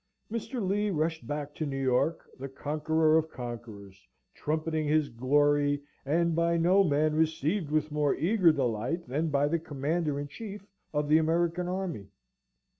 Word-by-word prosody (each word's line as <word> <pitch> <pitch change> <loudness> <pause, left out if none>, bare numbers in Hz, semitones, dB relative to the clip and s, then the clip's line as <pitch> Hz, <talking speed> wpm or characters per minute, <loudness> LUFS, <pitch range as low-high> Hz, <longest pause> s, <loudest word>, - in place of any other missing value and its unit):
Mr. 230 -2 -3
Lee 205 +2 +1
rushed 160 -2 -1
back 145 0 -4
to 155 - -4
New 135 -2 -3
York, 135 +5 +1
the 135 +1 -5
conqueror 155 +3 +2
of 160 0 -4
conquerors, 110 - -9 0.3
trumpeting 155 0 -2
his 150 -1 +2
glory, 145 +3 +2 0.3
and 170 +3 +2
by 170 0 +2
no 180 +4 +4
man 155 -2 +2
received 160 +2 0
with 155 0 0
more 150 -1 +1
eager 180 +2 +4
delight 130 +4 -1
than 155 +6 -1
by 145 0 +2
the 165 +3 0
Commander 150 0 -2
in 145 - -4
Chief 205 +4 -8 0.3
of 150 -1 -1
the 155 +2 +5
American 170 +2 +1
Army. 180 - -4
155 Hz, 155 wpm, -29 LUFS, 145-170 Hz, 0.3 s, the